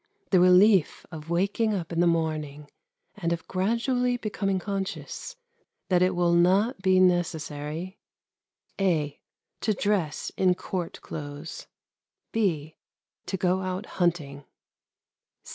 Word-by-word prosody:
The 185 - +6
relief 185 0 +5
of 160 -1 -9
waking 200 +5 +1
up 175 -3 -4
in 165 - -1
the 175 - +4
morning 155 -3 -2 0.4
and 170 -5 -2
of 165 -1 -3
gradually 245 +6 0
becoming 200 -3 -1
conscious 195 - -5 0.5
that 180 -2 +3
it 185 0 +3
will 175 -1 +2
not 190 +6 +3
be 190 -1 +4
necessary 170 -1 0 0.8
(a) 155 -7 0 0.4
To 215 - 0
dress 190 -7 -1
in 185 -1 +3
Court 175 -1 -5
clothes. 145 +1 -7 0.6
(b) 160 -8 -1 0.5
To 190 - -2
go 185 +1 +1
out 185 +2 -3 0.2
hunting. 150 -5 0
180 Hz, 115 wpm, -27 LUFS, 160-195 Hz, 0.8 s, The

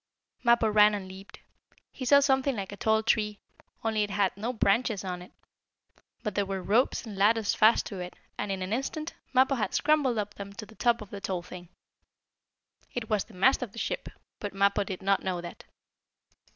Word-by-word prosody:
Mappo 235 -2 +4
ran 210 0 +5
and 195 -2 -6
leaped. 190 +1 -12 0.5
He 260 - -6
saw 280 +2 +6
something 270 -1 +2
like 200 -2 -5
a - - -6
tall 220 +1 +2
tree, 210 -2 +1 0.5
only 220 -1 +1
it 205 - 0
had 200 -1 +1
no 220 +5 -3
branches 220 -2 +1
on 180 -1 -4
it. 180 - -13 0.9
But 210 - -2
there 205 - +1
were 195 -1 -3
ropes 235 +6 +2
and 215 -3 -7
ladders 210 +2 +3
fast 220 +2 +4
to 200 -4 -6
it, 180 0 -6 0.2
and, 205 - -3
in 190 -1 -2
an 185 +3 -3
instant, 305 +6 -3 0.2
Mappo 260 +1 +4
had 215 -7 -1
scrambled 285 -5 +2
up 205 -1 -2
them 200 0 -8
to 215 - -8
the 220 - -16
top 235 0 +1
of 205 - -16
the 200 - -7
tall 185 -3 -3
thing. 180 -1 -10 1.3
It 225 -3 -4
was 210 -2 +1
the 220 - -17
mast 260 +11 +4
of 235 -5 -5
the - - -13
ship, - - -3 0.3
but 205 -2 -5
Mappo 200 +1 +3
did 190 -1 -6
not 195 0 +2
know 185 -2 -2
that. 175 0 -9
210 Hz, 205 wpm, -28 LUFS, 195-235 Hz, 1.3 s, saw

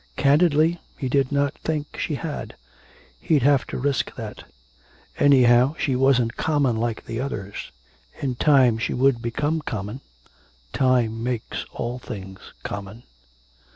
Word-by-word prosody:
Candidly, 155 +3 +3 0.2
he 135 - -3
did 135 0 +1
not 140 0 +1
think 150 -2 -3
she 150 - -2
had. 150 0 -5 0.6
He'd 145 - +2
have 140 -1 +3
to - - -5
risk 140 +1 -1
that. - - -8 0.7
Anyhow, 130 0 +5
she 135 - 0
wasn't 125 -3 +2
common 145 -6 +1
like 115 0 -2
the 115 - -4
others.... 100 -7 -5 0.5
In 135 -3 -1
time 130 -3 +4
she - - -1
would 130 -2 +2
become 145 +7 -1
common; 110 -1 -5 0.7
time 120 -4 +2
makes 120 -1 -3
all 120 +2 -4
things 95 -6 -8 0.2
common. 100 +4 -7
130 Hz, 130 wpm, -23 LUFS, 115-145 Hz, 0.7 s, Anyhow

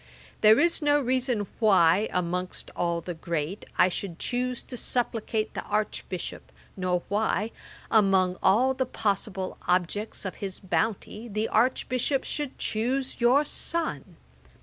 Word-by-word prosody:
There 215 +1 +7
is 340 0 +3
no 290 0 +4
reason 250 -4 0
why, 195 -2 +4
amongst 180 0 -2
all 170 -1 0
the 175 - -5
great, 165 +2 -3
I - - +6
should 180 -1 -4
chuse 250 +2 -2
to 255 - -8
supplicate 225 -3 -1
the - - -3
Archbishop, 210 -3 -3 0.2
nor 180 -2 0
why, 210 +1 0 0.4
among 190 -4 +4
all 255 +7 +4
the 260 -1 -1
possible 195 -4 -2
objects 185 +5 0
of 190 - -4
his 195 -2 -4
bounty, 215 +3 -2
the 215 0 -1
Archbishop 255 +3 +1
should 290 -3 -4
chuse 255 +5 -1
your 260 +5 +5
son. 315 - -2
215 Hz, 130 wpm, -27 LUFS, 185-250 Hz, 0.4 s, There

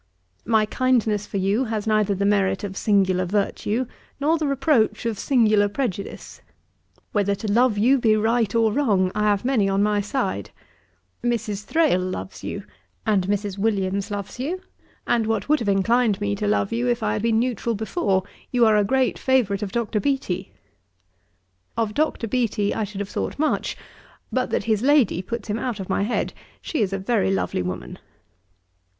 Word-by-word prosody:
My 220 -2 +4
kindness 220 -4 +1
for - - -4
you 200 +7 +1
has 220 -2 -3
neither 215 -2 +2
the 200 +1 -1
merit 195 -1 +2
of 195 -2 -5
singular 190 -3 +2
virtue, 205 +5 -1 0.3
nor 310 +3 +2
the 305 - 0
reproach 265 -6 +1
of 225 -3 -2
singular 215 -6 +3
prejudice. 205 -4 -4 0.7
Whether 200 -3 +1
to 210 +1 -3
love 240 -2 +3
you 255 +6 +4
be 220 -3 +4
right 225 0 +1
or 225 -2 +3
wrong, 205 -9 +2
I 210 0 0
have 205 +1 +1
many 235 -7 +2
on 195 +1 +2
my 210 0 +2
side: 210 +7 -2 0.7
Mrs. 215 -4 -2
Thrale 310 - +2
loves 140 - -5
you, - - -5 0.4
and 190 -4 +2
Mrs. 205 -1 -2
Williams 200 -1 0
loves 205 +3 -5
you, 340 +8 -3 0.4
and 230 -2 +1
what 220 -2 -1
would 305 +1 +3
have 225 -4 -1
inclined 210 +2 +2
me 100 0 -1
to 100 - -2
love 100 0 +1
you, 120 +2 0
if 120 - 0
I 105 - +1
had - - -2
been 225 0 +2
neutral 235 -1 -1
before, 200 - 0 0.3
you 245 -2 +3
are 215 -1 +5
a 210 - +4
great 260 +5 +1
favourite 240 -7 +2
of 205 -2 -3
Dr. 225 -2 -1
Beattie. 265 -6 -2 1.3
'Of 225 -2 0
Dr. 295 -5 0
Beattie 220 -3 0
I 220 - -1
should 200 0 -6
have 200 - -5
thought - - -3
much, 310 +2 0 0.5
but - - 0
that - - 0
his 215 -2 +1
lady 270 - +3
puts 225 +3 -5
him 210 +1 -2
out 245 -5 -3
of 190 - -6
my 190 - +1
head; 210 +4 -1 0.3
she 310 - -3
is 200 -3 +1
a 195 - -1
very 195 +1 +1
lovely 195 - 0
woman. 90 0 -5
210 Hz, 180 wpm, -23 LUFS, 195-240 Hz, 1.3 s, are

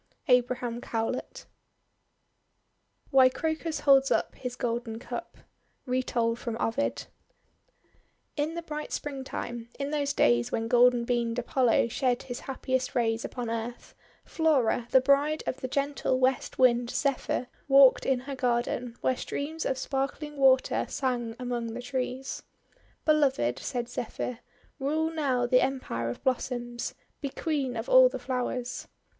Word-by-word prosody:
ABRAHAM 245 -1 +2
COWLET 225 +2 -3 1.7
WHY 260 -2 +7
CROCUS 315 +3 -2
HOLDS 275 -1 +5
UP - - +1
HIS 250 -1 -6
GOLDEN 235 -2 -3
CUP 235 - -7 0.5
Retold 240 -2 0
from 230 -2 -4
Ovid 255 +6 -1 1.3
IN 305 +2 -1
the 340 - -4
bright 300 -1 -6
Springtime, 260 -4 -5
in 280 0 -3
those 285 -2 0
days 120 0 +3
when 225 0 -1
golden 245 0 +4
beamed 235 -1 0
Apollo 245 -1 +2
shed 250 0 0
his 245 -2 -6
happiest 260 -1 -2
rays 225 -2 +1
upon 240 -3 -4
Earth, 230 +1 -5 0.3
Flora, 270 -7 +1
the 260 - +5
bride 285 +3 +2
of 260 - -2
the 260 - -4
gentle 280 -1 0
West 260 0 +1
Wind, 245 -2 +4
Zephyr, 275 -1 -1 0.2
walked 275 -1 +7
in 260 -2 +1
her 275 +2 -6
garden, 245 -1 -1
where 260 - +2
streams 305 +5 -4
of 265 - -1
sparkling 275 +3 -3
water 265 -2 +3
sang 240 -4 -2
among 240 -2 -3
the - - -4
trees. 255 +1 -3 0.6
"Beloved," 270 - +2
said 245 -3 -3
Zephyr, 245 0 -4 0.4
"rule 310 +4 0
now 270 -6 0
the 250 +1 +4
Em 265 0 0
pire 115 - -3
of 120 - -7
Blossoms! 240 -2 -2 0.3
Be 280 - -2
Queen 270 -4 -2
of 225 - -4
all - - +7
the - - -5
Flowers!' 250 -1 -3
255 Hz, 140 wpm, -28 LUFS, 240-275 Hz, 1.7 s, WHY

